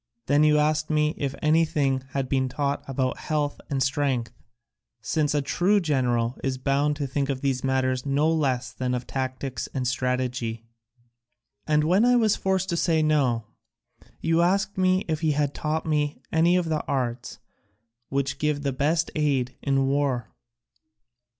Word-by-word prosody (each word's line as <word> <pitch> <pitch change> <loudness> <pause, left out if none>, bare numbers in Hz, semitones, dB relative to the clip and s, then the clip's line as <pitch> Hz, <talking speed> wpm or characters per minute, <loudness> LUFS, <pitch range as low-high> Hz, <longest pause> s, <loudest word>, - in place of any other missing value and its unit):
Then 145 +2 +3
you 150 0 +5
asked 150 0 +1
me 155 0 +2
if 140 -2 -3
anything 155 -4 +2
had 135 -1 -2
been 130 -1 0
taught 140 +2 -1
about 130 -1 -1
health 150 -2 -2
and 135 -2 +1
strength, 130 -3 0 0.7
since 145 +8 0
a 145 - +1
true 180 +9 +2
general 125 -7 0
is 135 -1 -1
bound 140 +2 +1
to 145 -1 -3
think 140 +1 -2
of 130 -2 -2
these 135 -2 -1
matters 130 -1 0
no 145 +2 +1
less 130 -7 0
than 125 +3 -2
of 125 0 -4
tactics 130 -2 -4
and 130 -2 -1
strategy. 125 -3 -2 1.0
And 150 0 +3
when 180 +7 +3
I 245 +1 +5
was 220 -4 +3
forced 190 0 -1
to 170 - 0
say 160 -2 +2
no, 135 -7 +1 0.8
you 165 +1 +2
asked 195 +3 +1
me 185 0 +2
if 155 -1 -2
he 155 -2 +2
had 145 -1 0
taught 155 +1 -2
me 150 -2 0
any 165 +2 +3
of 180 -1 +1
the 155 -2 -1
arts 125 -2 -2 0.7
which 140 0 -1
give 150 -1 0
the 140 -2 -1
best 160 +5 0
aid 135 -5 0
in 135 -1 +1
war. 135 -4 -1
140 Hz, 165 wpm, -25 LUFS, 130-155 Hz, 1.0 s, you